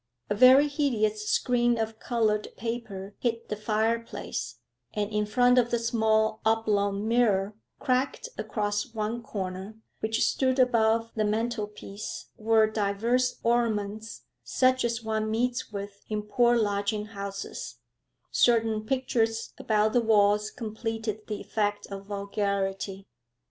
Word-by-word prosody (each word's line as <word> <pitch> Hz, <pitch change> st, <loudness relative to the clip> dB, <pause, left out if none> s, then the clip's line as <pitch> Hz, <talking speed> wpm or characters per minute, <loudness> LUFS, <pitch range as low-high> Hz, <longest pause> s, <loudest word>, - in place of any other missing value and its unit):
A -, -, +5 dB
very 260 Hz, +6 st, +7 dB
hideous 215 Hz, -8 st, 0 dB
screen 240 Hz, -1 st, +2 dB
of 220 Hz, 0 st, -3 dB
coloured 215 Hz, -3 st, 0 dB
paper 220 Hz, -4 st, -5 dB
hid 230 Hz, -1 st, -2 dB
the 210 Hz, -, -1 dB
fireplace, 220 Hz, +2 st, -2 dB, 0.4 s
and 210 Hz, 0 st, -1 dB
in 210 Hz, 0 st, 0 dB
front 245 Hz, +3 st, +4 dB
of 240 Hz, -1 st, +1 dB
the 240 Hz, -, +1 dB
small 220 Hz, -2 st, +1 dB
oblong 210 Hz, -2 st, +1 dB
mirror 215 Hz, -4 st, +2 dB, 0.2 s
cracked 260 Hz, -, 0 dB
across 210 Hz, +2 st, -2 dB
one 220 Hz, +2 st, -2 dB
corner 190 Hz, 0 st, -5 dB, 0.2 s
which 220 Hz, +1 st, 0 dB
stood 260 Hz, -1 st, +1 dB
above 230 Hz, -2 st, +3 dB
the 215 Hz, -, 0 dB
mantelpiece 210 Hz, -2 st, -3 dB
were 220 Hz, 0 st, +4 dB
divers 220 Hz, +4 st, 0 dB
ornaments 220 Hz, -2 st, -1 dB, 0.2 s
such 255 Hz, 0 st, +2 dB
as 230 Hz, -1 st, -1 dB
one 220 Hz, 0 st, -1 dB
meets 240 Hz, +2 st, -1 dB
with 200 Hz, 0 st, -7 dB
in 210 Hz, -1 st, -2 dB
poor 240 Hz, +3 st, +3 dB
lodging 205 Hz, -1 st, 0 dB
houses; 200 Hz, -1 st, -6 dB, 0.6 s
certain 225 Hz, -2 st, +3 dB
pictures 225 Hz, -2 st, 0 dB
about 215 Hz, 0 st, +2 dB
the 245 Hz, -, +4 dB
walls 210 Hz, -1 st, +3 dB
completed 220 Hz, -1 st, -4 dB
the 210 Hz, -2 st, -4 dB
effect 205 Hz, -1 st, -1 dB
of 195 Hz, 0 st, -7 dB
vulgarity. 200 Hz, -1 st, -2 dB
220 Hz, 125 wpm, -27 LUFS, 210-235 Hz, 0.6 s, very